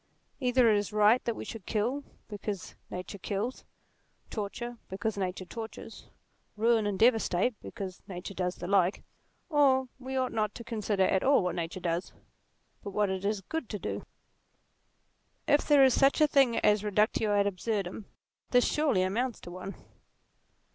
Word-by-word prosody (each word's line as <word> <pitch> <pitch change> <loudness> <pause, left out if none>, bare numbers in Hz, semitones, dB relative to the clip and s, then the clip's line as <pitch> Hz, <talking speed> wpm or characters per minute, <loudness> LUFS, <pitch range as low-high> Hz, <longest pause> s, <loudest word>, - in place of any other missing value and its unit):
Either 250 -1 +4
it 215 -2 +5
is 205 - -4
right 210 +3 +4
that 235 - -1
we - - -6
should 220 -6 -8
kill 240 +6 0 0.2
because 205 -2 -5 0.2
nature 185 +2 -6
kills; 210 +6 -3 0.7
torture 235 +3 -5
because 200 +3 -2
nature 185 -1 -3
tortures; 225 +4 -8 0.5
ruin 225 -1 +3
and 200 -2 -1
devastate 225 -1 +3
because 190 -5 -7
nature 185 0 -6
does 180 -1 -2
the 175 - -7
like; 190 0 +2 0.5
or 270 -4 +3
we 265 +1 -4
ought 255 -1 0
not 215 -2 -1
to 235 - -7
consider 215 -4 0
at 190 0 +2
all 275 -6 +4
what 180 - -1
nature 170 +2 -4
does, 175 0 -2 0.7
but 205 - -6
what 205 0 +1
it 190 0 -3
is 205 0 0
good 320 - -4
to 210 - -3
do. - - -4 1.4
If 290 0 +3
there 290 -2 +7
is 260 -2 +6
such 275 +4 +4
a 305 - +7
thing 275 -5 +3
as 210 -1 +4
a 210 - -4
reductio 210 +1 +2
ad 200 - +3
absurdum, 200 0 -2 0.4
this 245 -1 +4
surely 290 -12 +2
amounts 230 +6 -1
to 175 - -9
one. 185 +2 -7
210 Hz, 165 wpm, -30 LUFS, 190-245 Hz, 1.4 s, there